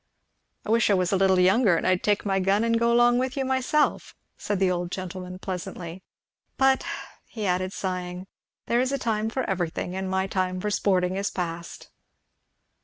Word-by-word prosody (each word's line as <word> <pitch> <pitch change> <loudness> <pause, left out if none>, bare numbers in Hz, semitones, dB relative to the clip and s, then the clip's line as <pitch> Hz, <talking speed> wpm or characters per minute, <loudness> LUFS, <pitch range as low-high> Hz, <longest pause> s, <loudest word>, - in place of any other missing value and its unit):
"I - - -2
wish 230 -1 +3
I 200 - +5
was 180 -2 +1
a - - +3
little 190 -1 +3
younger 190 0 +4
and - - -2
I'd 185 -1 +2
take 205 0 +1
my 195 -1 +1
gun 195 +3 +2
and 230 0 +2
go 235 0 +2
along 240 +1 +4
with 260 +2 -2
you 270 - 0
myself," 265 +3 0 0.2
said 205 - -2
the 185 -1 +2
old 175 -1 -2
gentleman 185 0 -6
pleasantly; 180 -1 -6 0.6
"but," 265 0 +3 0.4
he 215 -3 -5
added 185 0 0
sighing, 180 -1 -4 0.4
"there 240 +1 +2
is 260 +1 0
a 275 - 0
time 220 -3 -1
for 260 +3 -2
everything, 180 -1 -2
and 190 0 -3
my 190 0 0
time 185 -1 -1
for 210 +3 -2
sporting 185 -2 +1
is 200 +1 -1
past." 170 -1 -6
190 Hz, 185 wpm, -26 LUFS, 180-230 Hz, 0.6 s, I